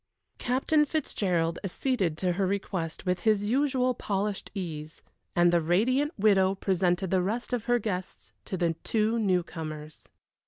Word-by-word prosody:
Captain 270 +5 +2
Fitzgerald 185 - -1
acceded 195 - -1
to 180 +1 0
her 190 +2 0
request 185 -4 -3
with 180 0 +1
his 215 -2 +2
usual 255 +2 +2
polished 200 -2 -2
ease, 160 -5 -6 0.3
and 175 0 +4
the 170 - +4
radiant 245 - +2
widow 195 -2 +4
presented 185 -1 0
the 190 -1 +3
rest 225 +7 -2
of 240 -3 -1
her 245 0 +3
guests 195 -5 -5
to 190 - -4
the 170 -1 +1
two 220 +1 +1
new 185 -5 +2
comers. 155 -2 -8
195 Hz, 150 wpm, -28 LUFS, 175-230 Hz, 0.3 s, and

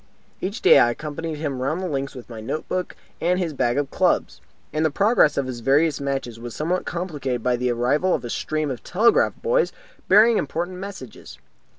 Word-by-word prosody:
Each 200 +5 -4
day - - +8
I 120 - +5
accompanied 155 +5 -5
him 140 -4 -3
round 145 +6 -1
the 185 - -3
links 140 -3 -3
with 125 - -10
my 115 -2 -8
note 135 +8 -4
book 185 0 -3 0.3
and 180 +2 +2
his 175 -4 -2
bag 120 -2 0
of 145 -1 -1
clubs, - - +1 0.3
and 155 +1 0
the 160 - +3
progress 200 -1 +3
of 140 - +1
his 125 -2 -5
various 140 +5 +2
matches 135 -4 -3
was 120 0 -7
somewhat 175 +4 -1
complicated 145 -9 -3
by 125 -1 +2
the 125 +1 -1
arrival 130 +10 +1
of - - -5
a 120 - -5
stream 155 -2 -2
of 125 - -7
telegraph 220 +6 +3
boys 485 +1 +2 0.4
bearing 215 +3 +6
important 175 +5 -3
messages. 190 - -9
150 Hz, 200 wpm, -23 LUFS, 130-180 Hz, 0.4 s, day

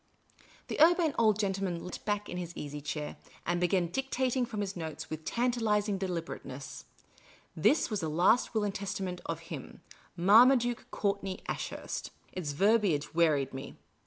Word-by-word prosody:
The - - -2
Urbane 335 -2 +5
Old 215 -3 +4
Gentleman 190 -4 -1
leant 180 - -7
back 205 0 -1
in 180 - -5
his 175 -1 -5
easy 145 0 -5
chair, 150 0 -4 0.3
and 175 0 0
began 180 0 +2
dictating 260 0 0
from 210 -2 -3
his 195 -1 -3
notes 160 -3 -6
with 155 0 -5
tantalising 220 -4 +1
deliber 175 -3 -3
ateness. 130 -1 -8 0.7
This 220 - +3
was 210 - 0
the 160 -4 -2
last 180 +10 +3
will 215 - +2
and 205 -1 -1
testament 190 -3 -4
of 165 +1 -5
him, 140 - -9 0.3
Marmaduke 240 +6 +5
Courtney 200 -2 -2
Ashurst. - - -4 0.2
Its 160 -6 -3
verbiage 195 -4 +2
wearied 155 -5 +2
me. 135 +1 -7
190 Hz, 155 wpm, -31 LUFS, 165-220 Hz, 0.7 s, Urbane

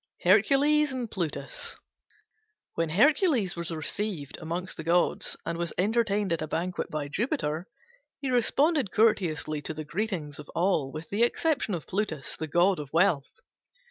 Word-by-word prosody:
HERCULES 275 +10 +4
AND 245 -4 -4
PLUTUS 190 - -4 1.0
When 165 -1 -1
Hercules 235 - +3
was 170 -1 -4
received 165 -1 -3
among 170 +3 -3
the 165 - -6
gods 170 +2 +1
and 170 - -3
was 170 -1 -2
entertained 205 -2 +1
at 165 - -2
a 155 - -2
banquet 175 +4 -2
by 150 -2 -3
Jupiter, 180 - -2 0.5
he 270 -2 -2
responded 275 - +2
courteously 175 -8 +1
to 155 - -5
the 155 0 -5
greetings 170 -5 -3
of 150 - -10
all 165 -6 +1
with 155 +2 -8
the 205 +3 0
exception 245 - +1
of 165 - -6
Plutus, 185 -8 -3
the 160 - -4
god 175 +4 +3
of 145 -2 -7
wealth. 165 -5 +3
180 Hz, 150 wpm, -28 LUFS, 160-225 Hz, 1.0 s, HERCULES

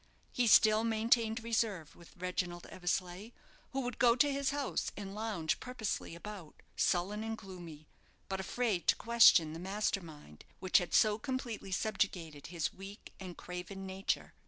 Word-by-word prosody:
He 245 -1 +1
still 215 0 +6
maintained 225 0 +2
reserve 220 -8 -1
with 170 - -17
Reginald 175 -1 -3
Eversleigh, 180 +3 -2 0.4
who 270 - -2
would 245 -2 -4
go 235 -1 +6
to 285 +3 +3
his 275 0 0
house, 285 -1 -2
and 195 -1 -6
lounge 210 -7 -2
purposelessly 230 -8 -4
about, 185 -3 -9 0.2
sullen 200 +4 +1
and 225 0 -3
gloomy, 175 -6 -10 0.4
but 190 0 -3
afraid 205 -2 -1
to - - +6
question 220 -9 +6
the 165 - -6
master 195 +2 -1
mind 150 - -13 0.2
which 185 +1 +4
had 180 - -2
so 215 0 +4
completely 240 -6 -4
subjugated 180 -7 -2
his 170 -2 -2
weak 195 +2 -11
and 185 -2 -8
craven 180 +2 -7
nature. 190 +1 -2
195 Hz, 155 wpm, -33 LUFS, 175-225 Hz, 0.4 s, still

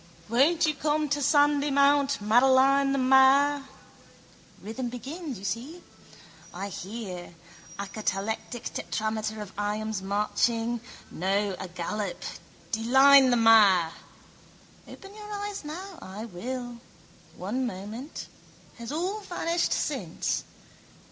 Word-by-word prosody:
Won't 290 +9 +3
you 310 - +1
come 300 +1 0
to 290 +1 0
Sandymount, 285 -2 +3
Madeline 265 +5 +4
the 275 - +1
mare? 270 +2 +5 0.9
Rhythm 235 +4 -5
begins, 275 - -6
you 195 - -9
see. 255 - -5 0.7
I 195 +3 -5
hear. 185 -3 -7 0.4
A 200 - -4
catalectic 215 +3 -3
tetrameter 215 0 -3
of 195 - -13
iambs 210 0 -2
marching. 225 +4 0 0.3
No, 195 +2 0
agallop: 185 +2 -4 0.5
deline 265 +4 +6
the 245 - +3
mare. 205 -7 +6 1.0
Open 390 0 -12
your 420 0 -10
eyes 410 -2 -5
now. 345 +4 -8
I 200 +4 -7
will. 240 +4 -6 0.6
One 245 +8 -2
moment. 215 +8 -7 0.5
Has 235 +1 -6
all 365 +7 -2
vanished 350 -3 -1
since? - - -2
245 Hz, 105 wpm, -27 LUFS, 210-285 Hz, 1.0 s, deline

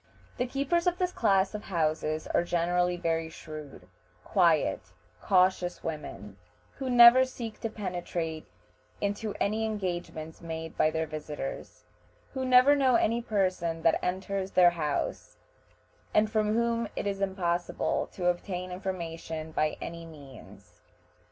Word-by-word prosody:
The 250 - 0
keepers 285 +7 0
of 355 0 +2
this 365 -1 0
class 195 - +2
of 210 - -6
houses 155 -3 -1
are - - +1
generally 175 +1 +1
very 165 -2 -1
shrewd, 155 -3 -10 0.4
quiet, - - +2 0.4
cautious 185 -1 +2
women, 130 -10 -6 0.4
who 265 -2 -3
never 245 +1 +9
seek 235 -4 -6
to 225 - -3
penetrate 175 -6 -4 0.5
into 205 +1 -2
any 215 +2 0
engagements 175 -6 -4
made 160 -1 -6
by 155 - +3
their 160 0 -1
visitors, 150 -2 -6 0.5
who 265 -1 -2
never 255 +3 +6
know 265 -3 +3
any 235 +1 +2
person 185 -7 -1
that 165 -1 +3
enters 190 +1 -2
their 180 -2 +6
house, 150 -4 -3 0.8
and 215 0 +4
from 215 -1 +1
whom 235 0 +1
it - - -3
is 200 -1 -2
impossible 175 -3 -1
to 180 - -4
obtain 180 +1 -1
information 165 -4 -5
by 155 0 0
any 170 0 -6
means. 145 -6 -14
180 Hz, 130 wpm, -29 LUFS, 165-215 Hz, 0.8 s, never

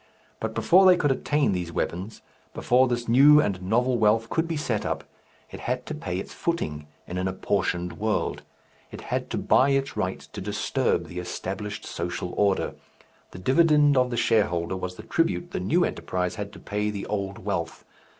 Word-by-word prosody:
But - - -4
before 190 +2 +5
they 180 -1 +7
could 145 -5 +2
attain 145 +1 +1
these 90 -3 -3
weapons, 95 +6 -4 0.3
before 130 +2 +3
this 120 -1 -2
new 140 +6 +7
and 100 -9 0
novel 120 +6 +1
wealth 110 +1 +2
could 165 0 0
be 165 -2 -2
set 120 -8 -1
up, - - -2 0.5
it - - -8
had 125 +1 -3
to - - -5
pay 95 - -4
its 95 - -6
footing 75 - -3 0.2
in 90 +1 -4
an 95 - -1
apportioned 90 -2 -1
world, 110 0 -1 0.5
it - - -9
had - - -3
to - - -2
buy 135 - +4
its 135 0 0
right - - -2
to - - -9
disturb - - 0
the 90 - -7
established 100 +3 -5
social 90 +1 -4
order. 100 -2 +1 0.6
The - - -11
dividend 145 - +4
of 125 -1 +3
the 120 - -3
shareholder 95 -7 +1
was 90 -1 -5
the - - -10
tribute 170 +1 0
the - - -2
new 165 - +2
enterprise 90 -1 -2
had 105 -2 -6
to - - -11
pay 105 +1 -2
the 100 -2 -4
old 100 -2 -3
wealth. 90 -5 -4
105 Hz, 185 wpm, -26 LUFS, 90-135 Hz, 0.6 s, they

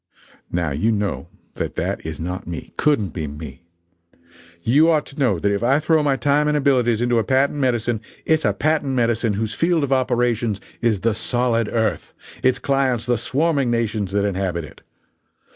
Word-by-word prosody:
Now 85 -3 -1
you 80 +11 +1
know 105 -2 -2 0.3
that - - -4
that - - -2
is 80 -2 -6
not 90 +2 -5
me 85 -2 -7
couldn't 145 -10 +1
be 80 -4 -4
me. 75 0 -9 1.0
You 145 - +4
ought 155 -3 +2
to 140 - -12
know 120 -9 +2
that 100 +5 0
if 100 0 -1
I 130 +4 +3
throw 155 0 +2
my 145 -2 +2
time 145 +4 +2
and 150 0 +2
abilities 125 -5 +2
into 120 -1 +2
a - - +1
patent 135 +3 +1
medicine, 120 -4 0 0.2
it's 160 0 +2
a - - +3
patent 150 -3 0
medicine 115 -2 +1
whose 110 +2 -2
field 165 +1 +1
of 135 -1 +1
operations 120 -4 +1 0.2
is 110 -5 +1
the 115 -1 +2
solid 115 0 0
earth! 110 -2 -1 0.3
its 130 -1 +3
clients 135 -4 0
the 125 - +2
swarming 140 -2 +1
nations 110 -4 -1
that 100 0 +1
inhabit 95 -4 -2
it! - - -15
120 Hz, 180 wpm, -21 LUFS, 100-140 Hz, 1.0 s, You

